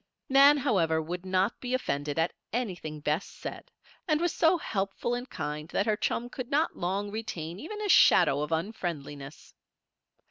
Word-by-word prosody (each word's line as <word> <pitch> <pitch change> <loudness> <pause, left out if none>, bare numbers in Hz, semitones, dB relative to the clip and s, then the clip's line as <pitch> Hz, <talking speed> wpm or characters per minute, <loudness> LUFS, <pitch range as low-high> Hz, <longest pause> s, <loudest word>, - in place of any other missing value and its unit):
Nan, 280 +2 +7
however, 185 - +2
would 175 +3 -5
not 190 +4 +1
be 250 0 -1
offended 145 - -2
at 165 +1 +1 0.2
anything 180 -10 -4
Bess 150 +5 0
said, - - -8 0.4
and 305 -2 +2
was 345 0 0
so 335 +2 +4
helpful 200 -4 -2
and 245 +2 -4
kind 150 +1 -5
that 200 - 0
her 215 - +2
chum 235 +3 -1
could 250 0 -7
not 305 +3 +1
long 195 +3 -2
retain 180 -6 -5
even 420 - -7
a - - -1
shadow 145 - +6
of 150 +1 -3
unfriendliness. 160 -6 -4
195 Hz, 165 wpm, -29 LUFS, 160-250 Hz, 0.4 s, Nan